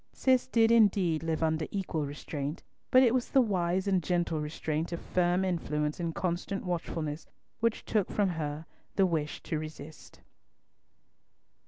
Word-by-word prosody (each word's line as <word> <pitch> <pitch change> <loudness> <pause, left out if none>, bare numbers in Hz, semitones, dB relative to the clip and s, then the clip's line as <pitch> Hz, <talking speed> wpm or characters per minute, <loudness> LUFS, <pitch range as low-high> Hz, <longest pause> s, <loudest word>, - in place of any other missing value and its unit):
Cis 260 -2 +2
did 225 -1 +4
indeed 195 -8 +4
live 165 0 -1
under 160 -1 0
equal 165 -7 -2
restraint, 145 +1 -5 0.3
but 255 +1 +7
it 240 -2 +4
was 255 -1 0
the 270 - +4
wise 190 -4 +1
and 190 -2 +2
gentle 170 -2 0
restraint 155 +1 -3
of 170 - -3
firm 180 +1 +1
influence 150 -4 -1
and 165 -2 -2
constant 185 +2 -2
watchfulness, 165 -3 -3 0.3
which 230 0 0
took 210 -4 +1
from 205 -2 +1
her 155 -2 -4 0.3
the 195 - +4
wish 155 -4 -2
to 155 - -2
resist. 155 0 -10
170 Hz, 150 wpm, -30 LUFS, 155-195 Hz, 0.3 s, but